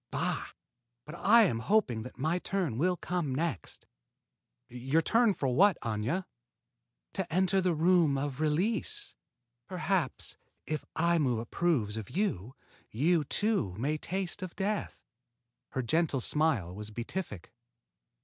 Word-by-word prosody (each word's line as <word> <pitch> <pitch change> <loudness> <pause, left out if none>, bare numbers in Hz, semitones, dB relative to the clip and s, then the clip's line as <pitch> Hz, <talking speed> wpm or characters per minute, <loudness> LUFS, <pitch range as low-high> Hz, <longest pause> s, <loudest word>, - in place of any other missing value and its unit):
Bah! - - -1 0.6
But 150 - -9
I 225 +6 +6
am 120 - +1
hoping 125 - +2
that 125 - -9
my 160 +7 0
turn 175 - -2
will 180 +3 +2
come 170 -8 -2
next." 155 - -3 0.8
"Your 130 +6 0
turn 230 -1 +4
for 135 - -1
what, 185 +9 +4
Aña?" 115 - -1 0.9
"To 190 -4 -3
enter 190 +2 +2
the 180 -2 +1
Room 165 -3 +4
of 135 0 -3
Release. 220 - 0 0.5
Perhaps, 185 -5 -2 0.3
if 155 0 -3
Aimu 160 -8 +2
approves 115 -4 0
of 110 - -6
you, 130 - -2 0.3
you, 155 +7 +2
too, 200 - 0
may 140 +7 0
taste 190 +2 -4
of 185 -2 -6
death." 205 +1 -2 0.7
Her 130 - -1
gentle 155 +1 +1
smile 125 - +1
was 105 +2 -7
beatific. 115 - -6
160 Hz, 130 wpm, -30 LUFS, 125-185 Hz, 0.9 s, I